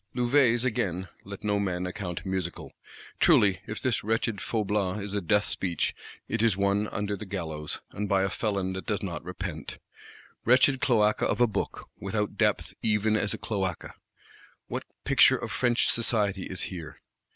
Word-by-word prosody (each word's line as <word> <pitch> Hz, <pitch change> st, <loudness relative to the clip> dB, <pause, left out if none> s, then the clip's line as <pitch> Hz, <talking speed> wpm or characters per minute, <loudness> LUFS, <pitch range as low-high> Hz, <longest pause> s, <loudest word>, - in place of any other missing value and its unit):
Louvet's 120 Hz, -1 st, +3 dB
again, 95 Hz, -6 st, -1 dB
let 100 Hz, 0 st, -9 dB
no 105 Hz, -1 st, +1 dB
man 90 Hz, -2 st, -1 dB
account 90 Hz, -1 st, -5 dB
musical. 95 Hz, -2 st, -3 dB, 0.5 s
Truly, 95 Hz, -3 st, +5 dB
if 105 Hz, -, -4 dB
this 130 Hz, -3 st, 0 dB
wretched 110 Hz, -1 st, 0 dB
Faublas 105 Hz, -3 st, 0 dB
is 100 Hz, 0 st, -5 dB
a 100 Hz, -, 0 dB
death 105 Hz, +4 st, +3 dB
speech, 90 Hz, -4 st, -1 dB, 0.3 s
it -, -, -1 dB
is 115 Hz, -5 st, +3 dB
one 100 Hz, +1 st, +2 dB
under 105 Hz, -1 st, -2 dB
the 100 Hz, -, -7 dB
gallows, 80 Hz, -6 st, -4 dB
and 105 Hz, 0 st, -3 dB
by 95 Hz, -1 st, +3 dB
a 95 Hz, -, +1 dB
felon 100 Hz, -4 st, -1 dB
that 95 Hz, -, -6 dB
does 105 Hz, -1 st, -1 dB
not 85 Hz, -5 st, -4 dB
repent. 90 Hz, -3 st, -6 dB, 0.7 s
Wretched 130 Hz, +2 st, +4 dB
cloaca 105 Hz, -5 st, +3 dB
of -, -, 0 dB
a 120 Hz, -, +6 dB
Book; 105 Hz, -4 st, -3 dB
without 105 Hz, +1 st, -2 dB
depth -, -, +1 dB
even 110 Hz, 0 st, +2 dB
as 105 Hz, -1 st, +1 dB
a -, -, -7 dB
cloaca! 95 Hz, -5 st, -3 dB, 0.7 s
What -, -, -4 dB, 0.2 s
"picture -, -, +6 dB
of -, -, -5 dB
French 120 Hz, -1 st, +2 dB
society" 105 Hz, -5 st, +1 dB
is 95 Hz, -, -4 dB
here? 85 Hz, -7 st, -6 dB
100 Hz, 165 wpm, -28 LUFS, 95-110 Hz, 0.7 s, a